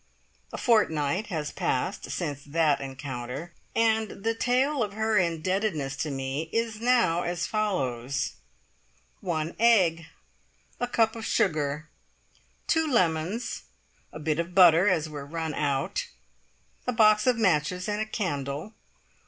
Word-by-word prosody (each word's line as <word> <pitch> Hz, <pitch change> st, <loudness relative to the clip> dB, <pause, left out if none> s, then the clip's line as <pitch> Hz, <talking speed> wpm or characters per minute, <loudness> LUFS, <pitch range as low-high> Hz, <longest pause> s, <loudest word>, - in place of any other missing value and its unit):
A -, -, -5 dB
fortnight 185 Hz, -, +2 dB
has 155 Hz, -5 st, -3 dB
passed -, -, -2 dB
since 145 Hz, -1 st, -3 dB
that 150 Hz, -1 st, +1 dB
encounter, 135 Hz, +3 st, -6 dB, 0.2 s
and 220 Hz, -3 st, +1 dB
the 225 Hz, -, +1 dB
tale 260 Hz, +4 st, +1 dB
of 205 Hz, -2 st, -1 dB
her 220 Hz, +1 st, 0 dB
indebtedness 170 Hz, -4 st, -1 dB
to 155 Hz, -, -2 dB
me 135 Hz, +3 st, -3 dB
is 225 Hz, -1 st, -1 dB
now 235 Hz, -9 st, +3 dB
as 175 Hz, 0 st, -2 dB
follows: 140 Hz, -, -1 dB, 0.9 s
One 165 Hz, -4 st, -2 dB
egg. 180 Hz, -9 st, +4 dB, 0.7 s
A 245 Hz, -, 0 dB
cup 225 Hz, -2 st, +2 dB
of 225 Hz, -, -6 dB
sugar. 155 Hz, -6 st, 0 dB, 0.8 s
Two 320 Hz, -1 st, +2 dB
lemons. 185 Hz, -, 0 dB, 0.5 s
"A -, -, -8 dB
bit 155 Hz, 0 st, -1 dB
of 170 Hz, +1 st, -3 dB
butter, 180 Hz, 0 st, +7 dB
as 165 Hz, -5 st, +2 dB
we're 150 Hz, -2 st, -7 dB
run 160 Hz, +2 st, -4 dB
out." 140 Hz, -2 st, -1 dB, 0.8 s
A -, -, +2 dB
box 215 Hz, -1 st, +4 dB
of 250 Hz, -2 st, +4 dB
matches 180 Hz, -3 st, +1 dB
and 210 Hz, 0 st, -1 dB
a -, -, 0 dB
candle. 145 Hz, -, -3 dB
175 Hz, 130 wpm, -27 LUFS, 150-220 Hz, 0.9 s, butter